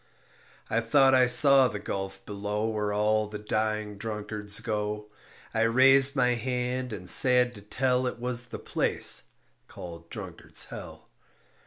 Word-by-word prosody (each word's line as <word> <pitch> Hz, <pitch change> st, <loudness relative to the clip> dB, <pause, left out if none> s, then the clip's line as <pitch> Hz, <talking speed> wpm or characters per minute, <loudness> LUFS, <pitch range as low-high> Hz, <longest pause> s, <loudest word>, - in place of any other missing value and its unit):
I 115 Hz, -, -1 dB
thought 135 Hz, +3 st, +3 dB
I 130 Hz, -1 st, +4 dB
saw 135 Hz, +1 st, +6 dB
the 105 Hz, -, -6 dB
gulf 95 Hz, -1 st, -6 dB
below 105 Hz, +1 st, -4 dB
Where 105 Hz, -2 st, -3 dB
all 105 Hz, +1 st, 0 dB
the 105 Hz, 0 st, -8 dB
dying 105 Hz, -1 st, -3 dB
drunkards 105 Hz, -1 st, -4 dB
go. 105 Hz, -1 st, -5 dB, 0.4 s
I 115 Hz, -, -1 dB
raised 135 Hz, +4 st, +4 dB
my 125 Hz, -2 st, +2 dB
hand 125 Hz, +1 st, -3 dB
and 95 Hz, -4 st, -8 dB
sad 125 Hz, +4 st, +6 dB
to 105 Hz, -, -13 dB
tell 125 Hz, +4 st, -1 dB
It 125 Hz, -, -5 dB
was 125 Hz, 0 st, -5 dB
the 120 Hz, -, -9 dB
place -, -, -1 dB, 0.4 s
called 85 Hz, -1 st, -11 dB
Drunkard's -, -, -6 dB
Hell. -, -, -11 dB
110 Hz, 145 wpm, -26 LUFS, 105-125 Hz, 0.4 s, saw